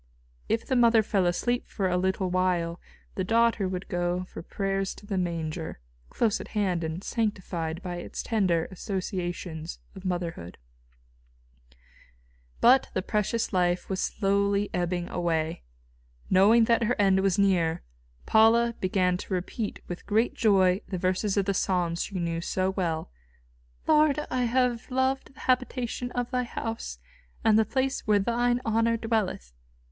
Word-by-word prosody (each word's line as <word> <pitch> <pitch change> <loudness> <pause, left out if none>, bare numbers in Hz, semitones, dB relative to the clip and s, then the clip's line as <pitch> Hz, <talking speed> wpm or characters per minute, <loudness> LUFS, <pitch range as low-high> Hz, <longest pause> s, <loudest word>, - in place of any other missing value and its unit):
If 225 - 0
the 260 - 0
mother 230 -2 +5
fell 195 -4 +1
asleep 240 +8 0
for 195 -3 -1
a 180 - 0
little 190 0 0
while, 180 -2 0 0.3
the 190 - -2
daughter 230 -1 +2
would 185 0 -4
go 175 0 -1
for 185 - -9
prayers 195 +2 -2
to - - -14
the 205 -1 -3
Manger, 165 - -3 0.3
close 220 -3 0
at - - -9
hand 185 -5 +1
and 160 +4 -4
sanctified 185 -7 -2
by 175 -2 -4
its 175 - -6
tender 185 -8 +1
associations 175 -3 -4 0.2
of 190 - -11
motherhood. 175 - -4 2.0
But 255 +2 +5
the 185 - 0
precious 215 +2 -1
life 180 0 +1
was 190 - -1
slowly 200 0 +1
ebbing 175 0 -1
away. 165 -2 -1 0.7
Knowing 210 +5 +6
that 230 +1 +3
her 240 +1 0
end 195 -2 +4
was 190 -2 +2
near, 180 -5 +2 0.4
Paula 230 +2 +5
began 185 -1 +1
to 190 - -6
repeat 200 +4 -4
with 175 - -7
great 220 +3 +2
joy 190 -3 +3
the 185 - -3
verses 185 +3 0
of 200 - +2
the 200 - +1
Psalms 175 -3 0
she 200 - -4
knew 170 -1 -2
so 185 +2 0
well: 170 - -2 0.7
"Lord, 305 -2 +4
I 250 -1 +1
have 245 -1 0
loved 260 +1 -1
the - - -16
habitation 250 -1 -1
of 245 0 -2
Thy 250 -1 +1
house, 225 - -5 0.5
and 220 0 +5
the 220 - +3
place 265 0 -1
where 210 -1 +5
Thine 240 +4 +1
honour 230 +1 +2
dwelleth!" 215 - -2
195 Hz, 150 wpm, -27 LUFS, 180-230 Hz, 2.0 s, Knowing